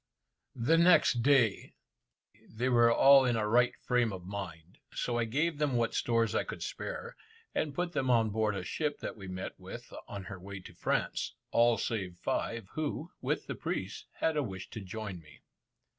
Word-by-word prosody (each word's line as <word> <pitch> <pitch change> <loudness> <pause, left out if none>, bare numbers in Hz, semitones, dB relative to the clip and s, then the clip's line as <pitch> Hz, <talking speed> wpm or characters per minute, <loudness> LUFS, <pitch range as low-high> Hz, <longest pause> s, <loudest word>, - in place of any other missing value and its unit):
The 145 +7 +3
next 170 -8 +5
day, 120 -6 +3 0.7
they 120 +4 -1
were 120 -1 +5
all 135 +3 +7
in 125 -2 +2
a 110 -2 0
right 120 +3 +3
frame 120 -2 +2
of 90 -2 -7
mind, 90 -3 -7 0.2
so 120 -1 -1
I 115 - +1
gave 150 +7 0
them 150 -3 +1
what 115 -1 +1
stores 115 -1 +1
I - - +1
could - - -6
spare, - - -5 0.4
and 145 -3 -1
put 175 0 -1
them 130 -6 -1
on 115 -3 +4
board 110 -1 +1
a 95 - -3
ship 150 - -2
that - - -4
we 100 -3 -9
met 95 0 -6
with - - -9
on 100 -1 -6
her 95 0 -8
way 100 +2 -8
to - - -12
France, - - -1 0.2
all 120 0 +4
save 95 -6 -3
five 115 +2 -2
who, 155 +2 -3
with - - -1
the - - -4
priest, - - -4
had 160 - 0
a 150 - +2
wish 95 -7 -6
to 110 - -6
join 95 -1 -6
me. 75 -3 -18
115 Hz, 190 wpm, -31 LUFS, 100-135 Hz, 0.7 s, all